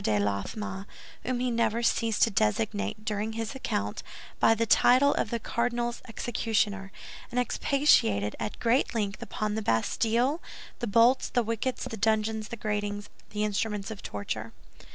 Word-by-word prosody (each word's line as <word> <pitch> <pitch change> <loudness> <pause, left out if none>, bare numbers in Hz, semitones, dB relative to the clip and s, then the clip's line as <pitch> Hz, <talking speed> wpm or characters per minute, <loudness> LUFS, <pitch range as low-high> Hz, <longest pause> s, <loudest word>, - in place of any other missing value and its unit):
de 105 -1 +2
Laffemas, 190 - -2 0.4
whom 250 -1 -1
he 250 0 0
never 230 0 +1
ceased 230 -2 +2
to 230 - +3
designate, 105 - 0
during 215 0 -2
his 225 +1 -3
account, 105 - -2 0.4
by 225 - +5
the 230 +1 +1
title 255 +5 +5
of - - -1
the 235 - -1
"cardinal's 235 +1 -1
executioner," 215 -4 -1 0.4
and 250 - -1
expatiated 175 - +3
at - - -4
great 240 +1 +2
length 205 -2 -1
upon 215 -1 -3
the 220 - -1
Bastille, 230 - +1 0.4
the 240 - -2
bolts, 235 +5 +4
the 245 - +1
wickets, 230 +3 -2
the 225 - -5
dungeons, 220 0 +1
the 235 - -6
gratings, 205 -1 -3 0.2
the 210 0 -2
instruments 210 0 -1
of 205 - -7
torture. 110 +2 -5
220 Hz, 155 wpm, -28 LUFS, 200-235 Hz, 0.4 s, by